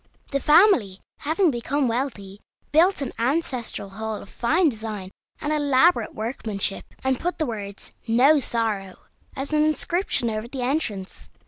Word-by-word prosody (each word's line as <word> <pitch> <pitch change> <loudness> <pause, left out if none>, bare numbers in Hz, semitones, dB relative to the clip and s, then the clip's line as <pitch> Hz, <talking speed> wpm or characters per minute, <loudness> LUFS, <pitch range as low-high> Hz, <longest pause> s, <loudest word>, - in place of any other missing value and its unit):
The 275 - +1
family, 295 - +4 0.2
having 320 +3 +2
become 265 +3 -1
wealthy, 225 -5 -3 0.3
built 335 +1 +4
an 270 - -5
ancestral 250 -5 -1
hall 220 +2 -4
of 200 - -9
fine 320 +8 +2
design 215 -5 -6 0.3
and 300 0 -1
elaborate 285 -3 +3
workmanship, 215 -3 -3 0.2
and 265 -1 +1
put 355 +2 -2
the 315 - 0
words 205 -5 -6
"No 265 +7 +5
Sorrow" 220 -7 -2 0.4
as 275 +3 -4
an 300 0 +4
inscription 310 - 0
over 215 +1 -4
the 255 0 -5
entrance. 235 -9 -3
250 Hz, 140 wpm, -24 LUFS, 215-300 Hz, 0.4 s, No